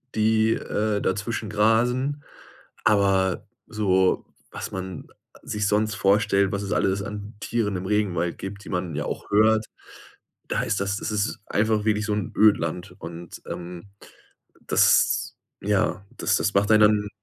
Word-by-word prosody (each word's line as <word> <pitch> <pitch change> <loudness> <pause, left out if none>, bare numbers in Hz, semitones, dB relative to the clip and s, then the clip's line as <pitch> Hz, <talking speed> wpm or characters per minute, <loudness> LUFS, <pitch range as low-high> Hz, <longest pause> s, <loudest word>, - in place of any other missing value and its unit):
die, 110 +1 +3
äh, 105 -1 -1
dazwischen 105 +3 -2
grasen, 125 +7 +1 0.6
aber 95 -3 +2 0.2
so, 95 -3 +1 0.3
was - - -6
man 95 -2 -6 0.4
sich 105 -1 -2
sonst 105 0 +1
vorstellt, 100 -1 +2
was 100 0 -2
es 100 - -5
alles 95 0 +1
an 105 +1 -7
Tieren 105 -2 -1
im 90 - -6
Regenwald 95 -5 0
gibt, 100 +1 -7
die - - -9
man 90 -4 -3
ja 75 - -2
auch - - -5
hört, 110 +1 +4 0.8
da - - -1
ist 105 -3 -1
das 100 +1 -1
es - - -3
ist 105 +1 -1
einfach 110 0 +1
wirklich 105 -1 +1
so 105 - -1
'n 105 -2 -3
Ödland. 90 -3 +2
Und, 85 0 -9
ähm, 90 +2 -7 0.8
das - - +3 0.3
ja, 100 -1 0
das - - +1
das - - 0
macht 100 +2 +2
einen 110 0 +6 0.2
dann 100 - -7
105 Hz, 150 wpm, -24 LUFS, 95-110 Hz, 0.8 s, einen